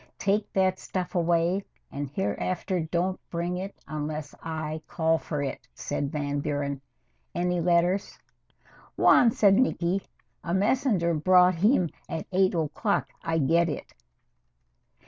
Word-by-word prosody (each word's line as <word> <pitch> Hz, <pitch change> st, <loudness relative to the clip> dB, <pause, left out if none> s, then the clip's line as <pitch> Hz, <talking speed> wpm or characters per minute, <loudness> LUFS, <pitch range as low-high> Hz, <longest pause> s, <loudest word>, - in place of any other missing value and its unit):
"Take 200 Hz, +2 st, 0 dB
that 185 Hz, -1 st, +2 dB
stuff 185 Hz, -2 st, -4 dB
away 175 Hz, +2 st, +1 dB, 0.3 s
and 140 Hz, 0 st, -4 dB
hereafter 185 Hz, +3 st, -2 dB
don't 175 Hz, +3 st, -1 dB
bring 175 Hz, +1 st, -2 dB
it 195 Hz, +2 st, -5 dB
unless 150 Hz, -1 st, -4 dB
I 155 Hz, -1 st, -4 dB
call 160 Hz, -1 st, +1 dB
for 150 Hz, -3 st, -3 dB
it," 130 Hz, -2 st, -5 dB
said 140 Hz, +2 st, -3 dB
Van 145 Hz, -1 st, -2 dB
Buren. 140 Hz, -1 st, -2 dB, 0.5 s
"Any 180 Hz, 0 st, 0 dB
letters?" 175 Hz, +3 st, +1 dB, 0.8 s
"One," 240 Hz, -, +6 dB
said 200 Hz, -3 st, +4 dB
Niki. 195 Hz, -7 st, +1 dB, 0.4 s
"A 170 Hz, +1 st, -1 dB
messenger 205 Hz, -4 st, +2 dB
brought 180 Hz, +3 st, +5 dB
him 185 Hz, -, +3 dB, 0.2 s
at 160 Hz, -, -4 dB
eight 185 Hz, 0 st, +3 dB
o'clock. 165 Hz, +6 st, 0 dB
I 165 Hz, 0 st, -1 dB
get 165 Hz, +3 st, +3 dB
it." 150 Hz, -, -6 dB
170 Hz, 125 wpm, -27 LUFS, 155-185 Hz, 0.8 s, One